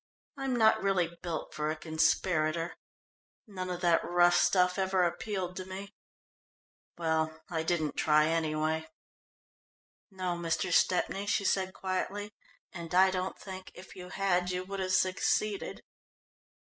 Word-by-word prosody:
"I'm 270 -2 -2
not 220 -2 +4
really 180 -4 +1
built 170 -3 -4
for 150 0 -2
a 155 - -1
conspirator. 160 +1 +1 0.7
None 185 -4 -6
of 180 0 -4
that 170 -2 +3
rough 175 0 +4
stuff 180 +1 +3
ever 190 -1 +2
appealed 180 0 -2
to 185 - -5
me. 190 +2 -8 1.0
Well, 160 -1 -1
I 165 -2 0
didn't 160 -2 -1
try, 150 0 +4
anyway." 160 0 0 1.2
"No, 185 -3 -3
Mr. 170 +1 -1
Stepney," 195 +3 +2
she 200 0 +1
said 190 -1 0
quietly, 200 +2 -3 0.4
"and 170 -1 -6
I 190 +1 +6
don't 185 0 -3
think, 190 -1 -9
if 185 +2 -12
you 180 -1 -9
had, 180 -2 +1
you 180 0 -2
would 195 +1 -6
have 185 0 -1
succeeded." 190 +2 0
180 Hz, 135 wpm, -31 LUFS, 165-190 Hz, 1.2 s, I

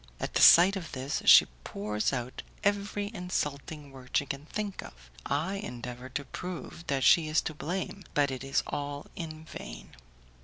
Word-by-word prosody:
At - - -4
the - - +2
sight 180 +4 +9
of 180 -4 -6
this, 130 +2 -3
she - - +9 0.2
pours 105 +1 -2
out 125 -2 -4 0.2
every 205 0 0
insulting 150 -6 -4
word 130 -2 -3
she 140 - +1
can 140 +1 -6
think 205 0 -4
of; - - -14 0.2
I 165 +8 -1
endeavour 125 - -7
to 140 - -7
prove 175 0 -7
that 135 -2 0
she 160 +3 +6
is 155 +1 +2
to 160 - -4
blame, 180 +5 -4
but 145 -2 +3
it 130 0 -5
is 135 0 0
all 145 0 -4
in 160 -1 -7
vain. - - -9
145 Hz, 175 wpm, -29 LUFS, 135-180 Hz, 0.2 s, sight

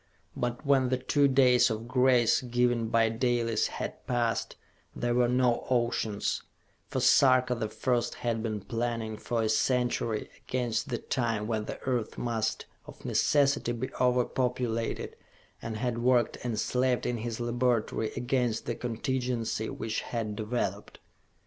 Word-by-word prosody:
But, 120 +3 -3
when 135 -2 +3
the 130 - +1
two 140 +2 +2
days 130 -2 +5
of 110 +1 -4
grace 125 -1 +4
given 120 -2 +1
by 115 0 +3
Dalis 115 -1 +1
had - - -6
passed, 120 -2 0 0.4
there 120 0 0
were 120 0 +3
no 125 -1 +2
oceans 120 -4 0 0.5
for - - -2
Sarka 130 -2 +5
the 115 -3 -3
First 125 0 -1
had 115 -2 -2
been 110 -2 -3
planning 115 0 -3
for 115 +1 -2
a - - +1
century 120 -2 0 0.2
against 120 -1 -2
the 120 - -1
time 115 -4 -1
when 110 -1 -2
the - - -6
earth 125 -4 -2
must 115 -2 -2 0.2
of - - -13
necessity 140 -4 +2
be 120 +2 -4
over 125 -1 +3
populated, 125 -3 -2 0.5
and 110 -1 -4
had 120 0 -2
worked 120 -1 +3
and 115 -3 -2
slaved 125 +1 +1
in 120 - -1
his 115 0 -4
laboratory 120 -2 0
against 125 -3 0
the 120 - -1
contingency 120 -1 -2
which 110 0 -3
had 110 -3 -3
developed. 105 -2 -3
120 Hz, 145 wpm, -29 LUFS, 115-125 Hz, 0.5 s, days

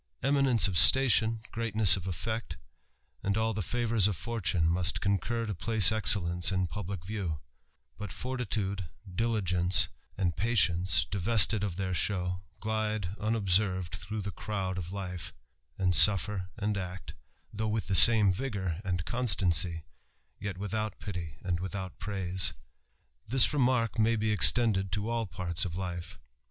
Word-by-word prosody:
Eminence 135 -5 +4
of 90 -4 +3
station, 115 +1 +5
greatness 110 -5 +3
of 95 -1 -6
effect, 105 0 -4 0.6
and 100 +1 -1
all 110 0 0
the 105 - -3
tivours 115 0 +1
of 105 - -2
fortune, 90 -7 -1
must 90 +2 0
concur 115 +4 -1
to 105 - -3
place 105 +1 +4
excellence 90 -5 +2
in 95 -1 0
publick 90 +1 -6
view; 95 -7 -4 0.6
but 105 -3 -6
fortitude, 105 -7 -4 0.3
diligence, 90 -4 +1 0.3
and 90 -4 -1
patience, 90 -4 +2
divested 105 +1 +4
of 95 -4 -3
their 95 0 -3
show, 90 -1 -2 0.2
gUde 110 -3 -2
unobserved 100 -5 0
through 105 +5 -6
the 100 +1 -5
crowd 95 0 -4
of 90 0 -7
life, 90 -4 -6 0.4
and 95 -2 +1
suffer 95 -1 +4
and 105 -1 -2
act, 90 0 -7 0.4
though 110 +1 -2
with 110 0 -2
the 100 - -3
same 105 -1 +6
vigour, 95 -6 -4
and 90 -4 -3
constancy, 90 - 0 0.6
yet 100 -2 -5
without 105 +2 -4
pity 85 -7 -6
and 90 -2 -2
without 95 0 -6
praise. 95 -3 -1 0.7
This 130 +5 +4
remark 125 -6 +1
may 115 +1 +3
be 110 0 -1
extended 105 -2 +3
to 105 +4 -2
all 115 -2 -2
parts 85 0 -3
of 90 -4 -4
life. 90 -2 -6
100 Hz, 145 wpm, -29 LUFS, 90-110 Hz, 0.7 s, same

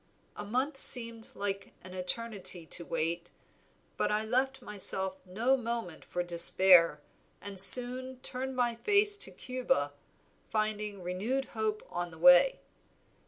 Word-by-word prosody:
A - - -10
month 255 +7 -5
seemed 230 -3 +6
an 195 -2 -8
eternity 185 -2 -1
to 170 - -7
wait, 170 +1 -6 0.7
but - - -3
I 215 +1 -3
left 265 +3 -4
myself 190 -2 -1
no 230 +9 -2
moment 230 -8 -8
for 180 - -6
despair, 170 -2 +2 0.4
and 200 -1 -7
soon 250 +5 +7
turned 260 0 -7
my 245 -1 -3
face 410 - +3
to - - -7
Cuba, 255 - -5 0.6
finding 215 -2 -5
renewed 215 +10 -5
hope 215 -1 -5
on 175 0 -7
the 160 - -17
way. 270 - +3
215 Hz, 125 wpm, -27 LUFS, 185-255 Hz, 0.7 s, soon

